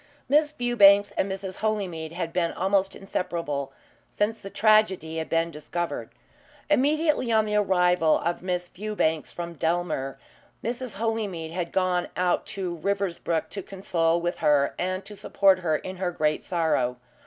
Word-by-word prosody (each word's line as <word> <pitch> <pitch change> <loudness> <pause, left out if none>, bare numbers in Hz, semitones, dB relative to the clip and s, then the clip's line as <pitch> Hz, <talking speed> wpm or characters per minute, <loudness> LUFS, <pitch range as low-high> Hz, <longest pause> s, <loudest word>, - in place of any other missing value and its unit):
Miss 295 +1 +3
Fewbanks 205 -7 +5
and 195 - 0
Mrs. 190 -1 -5
Holymead 190 -7 -2
had 170 -1 -4
been 170 -2 +1
almost 195 +1 +1
inseparable 165 -7 -3 0.4
since 220 +2 -1
the 195 - -7
tragedy 195 -7 +3
had 160 - -4
been 165 0 +1
discovered. 165 +3 -4 0.6
Immediately 295 -2 +2
on 220 -1 +4
the 210 - -3
arrival 180 -5 +3
of 170 +1 -2
Miss 180 -1 -2
Fewbanks 175 -6 -2
from 170 0 -6
Dellmere, 160 -5 -1 0.5
Mrs. 245 +1 -4
Holymead 205 -7 -2
had 170 0 -3
gone 185 -1 +1
out 180 -1 +1
to 180 -3 -4
Riversbrook 180 -2 -1
to 200 - -4
condole 170 -3 0
with 175 +1 -2
her, 145 -1 +3
and 185 +2 -2
to 210 - -10
support 195 -1 +3
her 165 -4 +1
in 185 +4 -5
her 180 -1 -1
great 155 -3 0
sorrow. 155 -8 0
180 Hz, 150 wpm, -26 LUFS, 165-205 Hz, 0.6 s, Fewbanks